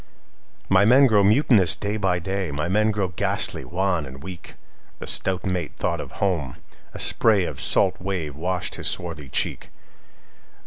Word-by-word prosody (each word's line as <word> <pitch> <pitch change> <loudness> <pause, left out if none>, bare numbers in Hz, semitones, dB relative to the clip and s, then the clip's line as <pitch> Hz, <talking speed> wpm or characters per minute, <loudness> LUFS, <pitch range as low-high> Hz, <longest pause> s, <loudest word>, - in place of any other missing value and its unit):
'""My 95 +1 +4
men 130 +6 +6
grow 105 -5 +4
mutinous 105 - +4
day 105 +1 -3
by 95 -4 0
day; 95 +1 -3
My 75 +4 -3
men 105 +4 +2
grow 105 -4 -1
ghastly 90 - -1
wan 90 -3 -1
and 65 +2 -11
weak."The 90 -1 -12
stout 95 -1 -1
mate 90 -2 -2
thought - - -2
of - - -10
home; 85 -11 -2 0.4
a - - -9
sprayOf 105 -6 +2
salt 95 -2 +2
wave 90 -7 -4
washed 90 +3 -2
his - - -2
swarthy 80 -6 -3
cheek. - - -3
95 Hz, 150 wpm, -23 LUFS, 85-100 Hz, 0.4 s, men